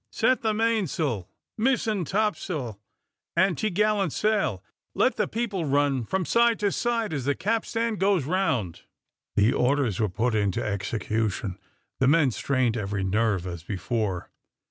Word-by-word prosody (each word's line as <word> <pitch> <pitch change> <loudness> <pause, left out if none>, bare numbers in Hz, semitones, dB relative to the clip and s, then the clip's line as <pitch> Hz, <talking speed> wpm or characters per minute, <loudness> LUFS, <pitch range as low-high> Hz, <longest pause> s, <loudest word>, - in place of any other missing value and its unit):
Set 255 - +2
the 220 - +1
mainsail, 185 - 0 0.3
mizen 225 -5 +1
topsail, 170 - -2 0.6
and 180 +1 +3
topgallant 210 -1 +1
sail. 205 - 0 0.3
Let - - +3
the - - 0
people 210 -7 -2
run 140 -3 +1
from 190 - -1
side 235 +3 +3
to 205 -1 +2
side 230 -5 -1
as 135 -4 -3
the 145 0 +1
capstan 225 +3 -1
goes 190 -7 +2
round." 130 - 0 0.5
The 105 +4 +4
orders 125 -5 +1
were 110 -2 +1
put 115 +6 0
into 100 -3 0
execution. 105 -1 -2 0.4
The 130 - +3
men 145 -2 +4
strained 125 -1 0
every 100 -2 -2
nerve 100 -1 +1
as 85 -3 -5
before. 95 +1 -3
140 Hz, 140 wpm, -26 LUFS, -, 0.6 s, The